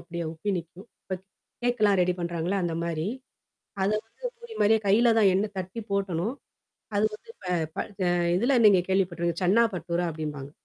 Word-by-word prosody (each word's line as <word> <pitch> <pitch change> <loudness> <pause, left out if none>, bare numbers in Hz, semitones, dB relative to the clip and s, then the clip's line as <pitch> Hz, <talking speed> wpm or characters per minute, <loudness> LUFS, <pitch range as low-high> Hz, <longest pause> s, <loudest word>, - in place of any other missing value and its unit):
அப்படியியே 170 -1 -5
உப்பி 165 +6 -3
நிக்கும். 170 +5 -10 0.2
இப்ப 185 - -4 0.4
கேக்கெல்லாம் 215 -5 +3
ரெடி 180 0 +1
பண்றாங்கல்ல! 175 +3 -1
அந்த 170 -1 -1
மாரி. 165 +1 -2 0.7
அத 190 - +2 0.2
வந்து - - -7
பூரி 475 -1 -10
மாரியே 220 +2 +5
கையில 230 +4 +5
தான் 205 -3 +6
எண்ண 195 +3 +2
தட்டி 185 +4 -4
போடணும் 200 +3 -1 0.6
அது 205 - +3
வந்து 455 - -13
ப - - -14 0.3
ப - - -10 0.3
அ - - +3 0.3
இதில 240 +8 +2
நீங்க 200 -4 +7
கேள்விப்பட்டுரு 170 -3 0
சென்னா 195 +6 +5
பட்டூரா 175 0 -1
அப்டீம்பாங்க. 150 -3 -5
185 Hz, 165 wpm, -27 LUFS, 170-210 Hz, 0.7 s, நீங்க